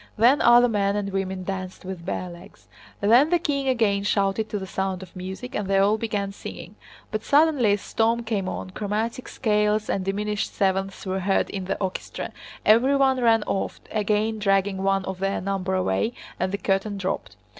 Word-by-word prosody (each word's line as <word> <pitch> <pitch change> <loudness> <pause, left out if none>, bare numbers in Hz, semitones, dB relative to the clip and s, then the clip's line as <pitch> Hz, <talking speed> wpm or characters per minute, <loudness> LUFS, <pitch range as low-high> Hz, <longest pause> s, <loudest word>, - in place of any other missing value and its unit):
Then 250 +8 +5
other 240 -1 +7
men 200 -3 +1
and 200 -1 -2
women 190 -1 -2
danced 185 -1 -5
with 185 -2 -6
bare 185 - -2
legs. 175 -1 -13 0.3
Then 240 +9 +5
the 350 - +4
king 280 -5 -1
again 220 -6 +2
shouted 200 +1 0
to 210 - -2
the 190 - -5
sound 190 0 -3
of 185 - -14
music, 190 +7 -7
and 210 - -2
they 195 0 +2
all 205 +3 +3
began 205 -3 -2
singing. 195 - -9 0.4
But 215 0 -2
suddenly 285 -7 +4
a - - +2
storm 230 +3 0
came 205 -5 -2
on, 185 - -5
chromatic 215 +5 -3
scales 210 -2 +1
and 195 - -1
diminished 205 +2 -2
sevenths 195 0 0
were 190 0 -1
heard 195 +1 +1
in 190 -2 -4
the 185 - -2
orchestra, 190 -2 -4 0.3
everyone 265 +3 +4
ran 225 -2 +4
off, 195 - -2
again 215 +1 0
dragging 195 -1 +1
one 195 0 +1
of 190 -1 -5
their 195 +1 0
number 190 0 -2
away, 185 - 0 0.3
and 185 +1 0
the 200 - -1
curtain 200 +1 -1
dropped. 190 -1 -3
200 Hz, 185 wpm, -24 LUFS, 190-225 Hz, 0.4 s, other